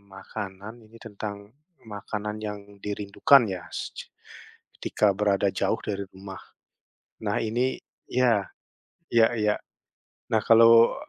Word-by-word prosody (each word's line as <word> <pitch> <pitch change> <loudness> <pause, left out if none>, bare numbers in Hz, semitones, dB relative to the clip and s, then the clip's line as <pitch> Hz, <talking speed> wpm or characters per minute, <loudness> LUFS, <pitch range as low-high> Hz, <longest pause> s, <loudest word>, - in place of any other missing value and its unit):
makanan, 100 +1 -7
ini 110 +2 -16
tentang 105 -1 -6 0.5
makanan 105 0 -5
yang 105 -1 -4 0.2
dirindukan 105 +6 +3
ya 95 -2 -4
secu - - -6 0.7
ketika 105 -2 +1
berada 100 -1 +2
jauh - - 0
dari 100 -1 -3
rumah. 95 0 -9 0.8
Nah 105 -1 0
ini, 120 +4 0 0.4
iya, 120 -6 +3 0.7
iya-iya. 110 -2 +3 0.8
Nah 110 - +3
kalau, 115 0 +7
105 Hz, 105 wpm, -26 LUFS, 100-115 Hz, 0.8 s, kalau